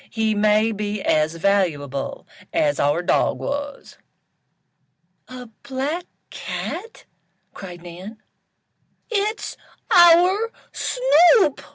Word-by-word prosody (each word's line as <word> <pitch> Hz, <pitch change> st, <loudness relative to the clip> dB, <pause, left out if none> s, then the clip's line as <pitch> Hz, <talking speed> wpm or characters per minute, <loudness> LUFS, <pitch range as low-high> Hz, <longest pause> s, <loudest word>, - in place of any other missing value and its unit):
He 220 Hz, -1 st, 0 dB
may 215 Hz, +1 st, +2 dB
be 210 Hz, 0 st, -4 dB
as 155 Hz, +1 st, +1 dB
valuable 160 Hz, -7 st, -1 dB, 0.3 s
as 145 Hz, -1 st, 0 dB
our 145 Hz, +5 st, +1 dB
dog -, -, +1 dB
was." 285 Hz, 0 st, -6 dB, 1.3 s
"A 255 Hz, -1 st, -9 dB, 0.2 s
black 285 Hz, +6 st, -4 dB, 0.2 s
cat!" 430 Hz, +7 st, -7 dB, 0.5 s
cried 175 Hz, -3 st, -10 dB
Nan. 180 Hz, +6 st, -10 dB, 0.9 s
"It's 425 Hz, 0 st, -2 dB, 0.3 s
our 360 Hz, +6 st, +5 dB, 0.2 s
Snoop!" 390 Hz, -, +3 dB
225 Hz, 85 wpm, -21 LUFS, -, 1.3 s, our